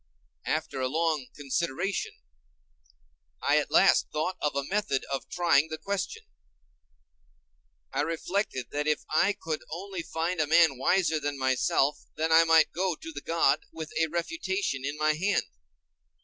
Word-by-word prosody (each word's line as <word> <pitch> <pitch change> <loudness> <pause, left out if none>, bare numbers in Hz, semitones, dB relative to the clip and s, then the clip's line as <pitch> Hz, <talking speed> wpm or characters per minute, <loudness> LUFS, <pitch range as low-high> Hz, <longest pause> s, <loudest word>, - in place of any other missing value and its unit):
After 155 -3 -2
a 130 - +1
long 155 -1 0
consideration, 170 +6 -2 1.3
I - - +3
at - - -3
last - - +5
thought 155 +5 -1
of 150 -2 0
a 140 - 0
method 190 -4 -1
of 135 - -4
trying 160 -4 +3
the 160 - -4
question. 200 - -4 1.7
I - - +1
reflected 165 - -2
that 150 +1 -2
if 150 -1 +1
I 185 +6 +3
could 160 -1 -3
only 185 +2 -5
find 165 +1 -2
a 150 - +1
man 160 -4 +4
wiser 170 +1 +2
than 145 -1 -3
myself, 135 +2 +1 0.2
then 160 +1 -1
I 165 +1 +7
might 160 -1 +5
go 180 -1 0
to 165 - -9
the 145 -2 -7
god 155 -3 +2
with 160 -1 -7
a 160 - +3
refutation 320 - -2
in 145 +1 -3
my 155 0 +2
hand. 190 +7 +1
160 Hz, 150 wpm, -28 LUFS, 145-175 Hz, 1.7 s, I